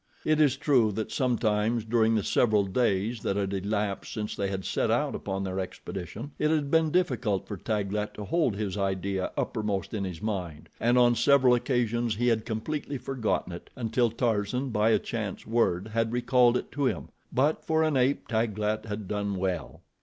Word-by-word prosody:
It 155 Hz, 0 st, +3 dB
is 140 Hz, -3 st, +4 dB
true 130 Hz, -7 st, +3 dB
that 110 Hz, +1 st, -3 dB
sometimes 115 Hz, -3 st, +1 dB
during 115 Hz, 0 st, +3 dB
the 105 Hz, -, +1 dB
several 110 Hz, -2 st, +3 dB
days 105 Hz, +1 st, 0 dB
that 100 Hz, -, -1 dB
had 100 Hz, -1 st, -1 dB
elapsed 100 Hz, +1 st, -2 dB
since 105 Hz, -1 st, -4 dB
they 100 Hz, -, -1 dB
had 95 Hz, -1 st, -4 dB
set -, -, 0 dB
out -, -, +1 dB
upon 95 Hz, 0 st, -3 dB
their 95 Hz, 0 st, -3 dB
expedition 95 Hz, -, -6 dB
it 150 Hz, -, +2 dB
had 150 Hz, -3 st, 0 dB
been 160 Hz, -1 st, +4 dB
difficult 125 Hz, -, 0 dB
for 105 Hz, -, -4 dB
Taglat 105 Hz, +1 st, -2 dB
to 105 Hz, -, -6 dB
hold 125 Hz, -, +1 dB
his 100 Hz, -1 st, -3 dB
idea 95 Hz, -1 st, -1 dB
uppermost 105 Hz, -2 st, -2 dB
in 105 Hz, -3 st, -2 dB
his 90 Hz, -4 st, -5 dB
mind, 90 Hz, -8 st, -4 dB
and 120 Hz, +2 st, +3 dB
on 120 Hz, -1 st, +6 dB
several 125 Hz, +2 st, +5 dB
occasions 120 Hz, -2 st, 0 dB
he 120 Hz, +3 st, +2 dB
had 110 Hz, -1 st, 0 dB
completely 140 Hz, +5 st, -3 dB
forgotten 120 Hz, -8 st, -2 dB
it, 85 Hz, -, -9 dB
until 120 Hz, 0 st, +1 dB
Tarzan, 115 Hz, +2 st, -1 dB
by 105 Hz, 0 st, +2 dB
a 110 Hz, -, +5 dB
chance 110 Hz, -5 st, -4 dB
word, 110 Hz, -4 st, +1 dB
had 115 Hz, 0 st, 0 dB
recalled 125 Hz, 0 st, +3 dB
it -, -, -6 dB
to 145 Hz, -1 st, -1 dB
him, -, -, -3 dB, 0.2 s
but, 145 Hz, +5 st, +1 dB
for 160 Hz, 0 st, +2 dB
an 155 Hz, -2 st, +1 dB
ape, 130 Hz, +2 st, +1 dB
Taglat 110 Hz, -1 st, -1 dB
had 105 Hz, -2 st, -5 dB
done 100 Hz, 0 st, -2 dB
well. 90 Hz, -3 st, -3 dB
110 Hz, 185 wpm, -28 LUFS, 100-125 Hz, 0.2 s, on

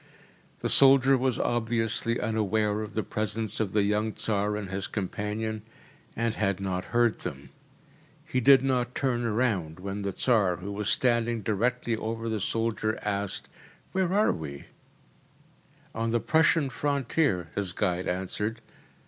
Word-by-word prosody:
The -, -, 0 dB
soldier 135 Hz, 0 st, +6 dB
was 130 Hz, -2 st, 0 dB
obviously 115 Hz, 0 st, 0 dB
unaware 110 Hz, -1 st, 0 dB
of 110 Hz, -, -7 dB
the 110 Hz, -, 0 dB
presence 110 Hz, 0 st, -2 dB
of 105 Hz, -4 st, -1 dB
the 105 Hz, -1 st, +2 dB
young 105 Hz, +2 st, 0 dB
Tsar 105 Hz, -1 st, 0 dB
and 100 Hz, -2 st, -6 dB
his 95 Hz, 0 st, -3 dB
companion, 105 Hz, +2 st, -3 dB, 0.5 s
and 115 Hz, 0 st, 0 dB
had 100 Hz, -4 st, 0 dB
not 95 Hz, -1 st, -2 dB
heard 120 Hz, -1 st, +2 dB
them. -, -, -7 dB, 0.7 s
He 130 Hz, -, -1 dB
did 135 Hz, +1 st, +7 dB
now 125 Hz, -2 st, +1 dB
turn 120 Hz, -3 st, 0 dB
round 100 Hz, -9 st, 0 dB
when 100 Hz, +2 st, -4 dB
the 100 Hz, 0 st, -2 dB
Tsar, 100 Hz, -4 st, +2 dB
who 95 Hz, +4 st, -7 dB
was 100 Hz, 0 st, -2 dB
standing 120 Hz, -2 st, +1 dB
directly 120 Hz, +3 st, 0 dB
over 115 Hz, +1 st, -4 dB
the 110 Hz, -2 st, -2 dB
soldier, 110 Hz, 0 st, -1 dB
asked, 100 Hz, -1 st, -2 dB, 0.4 s
“Where 185 Hz, -2 st, 0 dB
are 210 Hz, +3 st, +3 dB
we?‚ÄĚ 70 Hz, -3 st, -6 dB, 1.3 s
“On 115 Hz, 0 st, -1 dB
the 120 Hz, +1 st, +2 dB
Prussian 160 Hz, 0 st, +3 dB
frontier,‚ÄĚ 140 Hz, -, 0 dB
his 100 Hz, -3 st, -1 dB
guide 90 Hz, +1 st, -1 dB
answered. 105 Hz, +5 st, -2 dB
110 Hz, 145 wpm, -28 LUFS, 100-120 Hz, 1.3 s, did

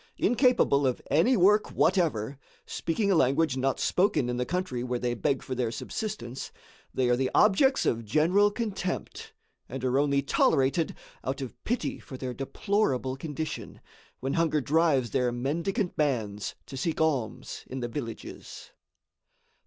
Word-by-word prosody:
Incapable 245 Hz, -, +3 dB
of 125 Hz, -, -1 dB
any 175 Hz, -, +4 dB
work 205 Hz, +3 st, +4 dB
whatever, 145 Hz, -, +1 dB, 0.3 s
speaking 200 Hz, +5 st, -1 dB
a -, -, +4 dB
language 140 Hz, 0 st, +3 dB
not 135 Hz, 0 st, 0 dB
spoken 180 Hz, -9 st, +2 dB
in 125 Hz, -, -2 dB
the 125 Hz, -, -1 dB
country 175 Hz, -9 st, -2 dB
where 125 Hz, 0 st, -1 dB
they 120 Hz, 0 st, -1 dB
beg 135 Hz, +2 st, 0 dB
for 130 Hz, -, -4 dB
their 125 Hz, -2 st, -1 dB
subsistence, 135 Hz, -, -5 dB, 0.4 s
they 130 Hz, -1 st, +1 dB
are 120 Hz, -, +4 dB
the 130 Hz, +1 st, 0 dB
objects 265 Hz, +7 st, +4 dB
of 115 Hz, 0 st, 0 dB
general 170 Hz, -, +3 dB
contempt, 205 Hz, -4 st, -4 dB, 0.4 s
and 130 Hz, +1 st, -6 dB
are 130 Hz, +1 st, +2 dB
only 140 Hz, -1 st, +2 dB
tolerated 140 Hz, +4 st, +2 dB, 0.3 s
out 130 Hz, +2 st, -3 dB
of 130 Hz, -3 st, -8 dB
pity 245 Hz, +1 st, -1 dB
for 130 Hz, -, -9 dB
their 130 Hz, -1 st, -4 dB
deplorable 135 Hz, -, -1 dB
condition, 155 Hz, +2 st, -5 dB, 0.4 s
when 135 Hz, +2 st, -1 dB
hunger 165 Hz, -2 st, +2 dB
drives 145 Hz, -5 st, +2 dB
their 125 Hz, +1 st, +1 dB
mendicant 170 Hz, -, -1 dB
bands 110 Hz, -9 st, -1 dB
to 135 Hz, -, -9 dB
seek 155 Hz, +5 st, -2 dB
alms 145 Hz, -8 st, -1 dB
in 130 Hz, 0 st, -5 dB
the 120 Hz, -, -2 dB
villages. 115 Hz, -2 st, -7 dB
140 Hz, 150 wpm, -28 LUFS, 125-180 Hz, 0.4 s, any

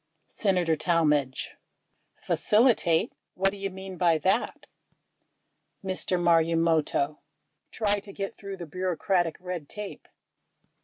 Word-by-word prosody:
Senator 180 Hz, -6 st, +1 dB
Talmadge. 150 Hz, -5 st, +1 dB, 0.7 s
"Facilitate" 210 Hz, -7 st, +3 dB
— -, -, -56 dB
what 195 Hz, +1 st, +2 dB
do 200 Hz, -, -9 dB
you 195 Hz, 0 st, -3 dB
mean 190 Hz, 0 st, -8 dB
by 170 Hz, -3 st, +4 dB
that? 190 Hz, +8 st, 0 dB, 1.2 s
Mr. 185 Hz, -1 st, -1 dB
Marumoto. 165 Hz, -3 st, +2 dB, 0.5 s
Try 205 Hz, -2 st, +1 dB
to 200 Hz, 0 st, -11 dB
get 195 Hz, 0 st, -5 dB
through 200 Hz, -1 st, -7 dB
the 175 Hz, -, -6 dB
bureaucratic 180 Hz, 0 st, -1 dB
red 180 Hz, -5 st, -6 dB
tape. 210 Hz, -1 st, -7 dB
180 Hz, 110 wpm, -27 LUFS, 165-195 Hz, 1.2 s, by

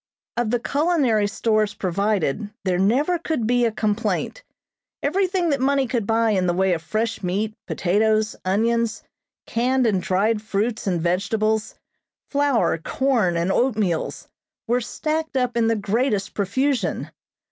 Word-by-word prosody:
Of 240 Hz, -2 st, 0 dB
the 245 Hz, +1 st, +1 dB
culinary 275 Hz, -7 st, +1 dB
stores 215 Hz, 0 st, 0 dB
provided 200 Hz, 0 st, -1 dB, 0.2 s
there 180 Hz, -1 st, +1 dB
never 275 Hz, -, +2 dB
could 315 Hz, -8 st, -2 dB
be 245 Hz, +1 st, +2 dB
a 230 Hz, -, +1 dB
complaint. 215 Hz, -, -1 dB, 0.6 s
Everything 360 Hz, +2 st, +1 dB
that 275 Hz, -2 st, 0 dB
money 275 Hz, 0 st, +2 dB
could 230 Hz, -4 st, -2 dB
buy 225 Hz, 0 st, +2 dB
in 185 Hz, -3 st, +1 dB
the 175 Hz, -, +1 dB
way 190 Hz, 0 st, +2 dB
of 165 Hz, -, -2 dB
fresh 215 Hz, +8 st, -2 dB
meat, 200 Hz, +4 st, -1 dB
potatoes, 215 Hz, +4 st, +1 dB
onions, 230 Hz, +4 st, 0 dB, 0.4 s
canned 255 Hz, +2 st, +1 dB
and 200 Hz, -5 st, +2 dB
dried 210 Hz, +4 st, +1 dB
fruits 215 Hz, +1 st, -2 dB
and 180 Hz, -3 st, +1 dB
vegetables, 210 Hz, +5 st, 0 dB, 0.6 s
flour, 280 Hz, -, +2 dB
corn 225 Hz, -, +1 dB
and 170 Hz, +3 st, 0 dB
oatmeals, 210 Hz, -9 st, 0 dB, 0.4 s
were 245 Hz, +1 st, +1 dB
stacked 310 Hz, +4 st, -2 dB
up 250 Hz, -2 st, 0 dB
in 230 Hz, -1 st, +2 dB
the 225 Hz, -, +2 dB
greatest 210 Hz, 0 st, 0 dB
profusion. 220 Hz, -, -1 dB
220 Hz, 140 wpm, -23 LUFS, 200-250 Hz, 0.6 s, never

